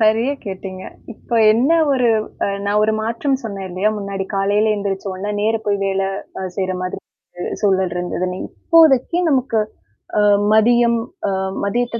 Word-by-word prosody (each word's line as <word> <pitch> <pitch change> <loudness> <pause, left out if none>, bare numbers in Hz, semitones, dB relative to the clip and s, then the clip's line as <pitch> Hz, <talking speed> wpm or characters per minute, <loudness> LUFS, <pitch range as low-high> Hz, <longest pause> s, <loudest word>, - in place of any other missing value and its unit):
சரியா 225 +5 +3
கேட்டீங்க. 190 -1 -6 0.3
இப்ப - - -28 0.2
என்ன 250 +8 +2 0.2
ஒரு 250 -3 +2 0.4
அ, - - +1 0.2
நான் 210 +1 +2
ஒரு 220 - +1
மாற்றம் 260 +4 -1
சொன்னேன் 195 -3 -5
இல்லையா? 190 +4 +1
முன்னாடி 195 -1 -4
காலையில 205 +2 +2
எந்திரிச்ச 200 -1 -3
உடனே 195 +3 -4
நேரா 225 +1 +1
போய் 200 -1 +1
அ - - 0
வேலை 195 0 0 0.5
செய்ற 190 -1 -1
மாதிரி 185 - -4 0.4
ஒரு 175 - -5 0.2
சூழல் 190 -3 +2
இருந்ததுன்னு. 180 +1 -3
இப்போதைக்கு 320 -1 +4
நமக்கு 250 -5 +1 0.9
மதியம் 235 +1 +4 0.3
அ - - -1 0.3
மதியத்தை 235 +2 -1
210 Hz, 145 wpm, -19 LUFS, 195-235 Hz, 0.9 s, இப்போதைக்கு